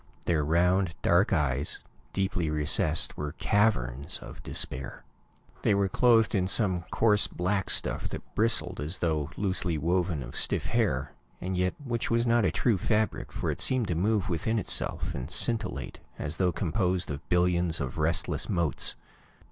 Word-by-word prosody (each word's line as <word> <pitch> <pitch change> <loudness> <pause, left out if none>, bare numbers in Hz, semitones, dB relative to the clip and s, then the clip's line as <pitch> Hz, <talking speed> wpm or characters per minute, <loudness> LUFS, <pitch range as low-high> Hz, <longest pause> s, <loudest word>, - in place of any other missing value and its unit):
Their 80 -4 +1
round, 90 +3 +2
dark 85 +4 +3
eyes, 70 -6 0 0.3
deeply 95 -4 -1
recessed, 75 +1 +1
were 75 0 -4
caverns 70 - 0
of - - -11
despair. 65 -1 -2 0.6
They 100 - +3
were 100 -1 +1
clothed 115 +1 +4
in 95 -3 +1
some 95 -4 +3
coarse, 105 -2 +3
black 95 +2 -1
stuff - - 0
that - - -8
bristled 115 -8 +1
as 75 +6 -1
though 80 -3 -1
loosely 95 -4 0
woven 85 -1 0
of - - -10
stiff - - +1
hair, 85 - 0 0.3
and 95 +1 -3
yet 90 0 0
which 120 -5 -3
was 115 0 +2
not 115 -2 +3
a 90 - +2
true 110 +1 +1
fabric, 110 +3 0
for - - -2
it - - -3
seemed 125 -5 +2
to - - +1
move 100 +3 +1
within 110 +6 -1
itself, 105 - -2
and 65 +1 -5
scintillate, 115 +4 -2 0.2
as 75 +3 -3
though 90 -1 +2
composed 90 -1 -1
of 70 +4 -7
billions 90 -2 +2
of 65 +2 -4
restless 80 +2 0
motes. 85 - +1
90 Hz, 160 wpm, -28 LUFS, 80-105 Hz, 0.6 s, clothed